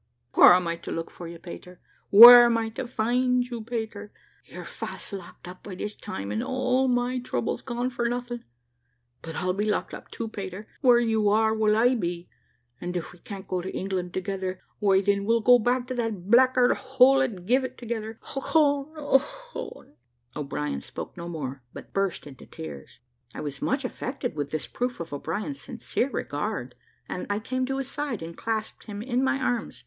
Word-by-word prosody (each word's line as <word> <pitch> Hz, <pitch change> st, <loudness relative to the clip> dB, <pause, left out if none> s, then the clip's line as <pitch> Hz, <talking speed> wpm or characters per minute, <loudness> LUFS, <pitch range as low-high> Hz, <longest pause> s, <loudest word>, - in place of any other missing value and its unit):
Where -, -, +9 dB
am 180 Hz, -1 st, +2 dB
I 170 Hz, 0 st, -2 dB
to -, -, -8 dB
look 165 Hz, 0 st, -4 dB
for 175 Hz, -, -9 dB
you, 170 Hz, 0 st, -8 dB
Pater? 180 Hz, +1 st, -11 dB, 0.3 s
Where 240 Hz, +3 st, +12 dB
am 235 Hz, -1 st, +3 dB
I 225 Hz, -1 st, -1 dB
to 240 Hz, +3 st, -5 dB
find 250 Hz, +2 st, +1 dB
you, 240 Hz, -3 st, -6 dB
Pater? 220 Hz, -3 st, -5 dB, 0.3 s
You're -, -, -9 dB
fast -, -, -7 dB
locked 185 Hz, -2 st, -9 dB
up 180 Hz, +1 st, -10 dB
by 195 Hz, -, -8 dB
this 210 Hz, +3 st, -5 dB
time, 100 Hz, +1 st, -6 dB
and 105 Hz, -, -1 dB
all 260 Hz, 0 st, +1 dB
my 250 Hz, 0 st, +1 dB
trouble's 125 Hz, -, -2 dB
gone 245 Hz, 0 st, -3 dB
for 240 Hz, -1 st, -1 dB
nothing. 245 Hz, 0 st, -4 dB, 0.8 s
But 165 Hz, -1 st, -7 dB
I'll 180 Hz, +2 st, 0 dB
be 210 Hz, +3 st, -1 dB
locked -, -, -1 dB
up -, -, -9 dB
too, 230 Hz, -, -5 dB
Pater. 200 Hz, -1 st, -7 dB
Where 250 Hz, -3 st, +6 dB
you 220 Hz, -3 st, +2 dB
are, 220 Hz, +1 st, +3 dB
will 215 Hz, -1 st, +2 dB
I 245 Hz, +3 st, +4 dB
be; 175 Hz, -6 st, -3 dB, 0.5 s
and 180 Hz, +1 st, -3 dB
if 170 Hz, -, -6 dB
we 175 Hz, -, -17 dB
can't 195 Hz, +1 st, -9 dB
go 185 Hz, -1 st, -1 dB
to 185 Hz, -, -5 dB
England 185 Hz, -2 st, -3 dB
together, 185 Hz, 0 st, -3 dB, 0.2 s
why 195 Hz, -2 st, +4 dB
then 200 Hz, 0 st, +1 dB
we'll 230 Hz, +3 st, +3 dB
go 245 Hz, +2 st, +6 dB
back 245 Hz, +2 st, +1 dB
to 255 Hz, -, -4 dB
that 220 Hz, -6 st, -3 dB
blackguard 255 Hz, 0 st, +5 dB
hole 265 Hz, +1 st, +4 dB
at 205 Hz, -9 st, -2 dB
Givet 260 Hz, +4 st, +1 dB
together. 225 Hz, -2 st, -5 dB, 0.2 s
Ochone! 285 Hz, +1 st, +1 dB
Ochone!" 290 Hz, -, -2 dB, 0.4 s
O'Brien 75 Hz, -, -3 dB
spoke -, -, -8 dB
no 170 Hz, 0 st, -7 dB
more, 140 Hz, -5 st, -5 dB
but -, -, -11 dB
burst 195 Hz, -3 st, -1 dB
into 140 Hz, -3 st, -12 dB
tears. 75 Hz, -, -10 dB, 0.3 s
I -, -, -5 dB
was 140 Hz, -2 st, -6 dB
much -, -, 0 dB
affected -, -, -4 dB
with 145 Hz, -2 st, -3 dB
this 155 Hz, 0 st, -3 dB
proof 245 Hz, 0 st, -3 dB
of 165 Hz, -3 st, -6 dB
o'brien's 205 Hz, -, -4 dB
sincere 250 Hz, +1 st, -2 dB
regard, 145 Hz, -, -3 dB, 0.3 s
and 180 Hz, -, -5 dB
I 205 Hz, -, 0 dB
came 255 Hz, +4 st, -2 dB
to 270 Hz, 0 st, -2 dB
his 270 Hz, -1 st, -4 dB
side, 280 Hz, -, -3 dB
and 165 Hz, +1 st, -8 dB
clasped 220 Hz, -1 st, -4 dB
him 205 Hz, 0 st, -6 dB
in 250 Hz, +1 st, 0 dB
my 270 Hz, +1 st, +2 dB
arms. 245 Hz, -3 st, -2 dB
220 Hz, 190 wpm, -26 LUFS, 180-245 Hz, 0.8 s, Where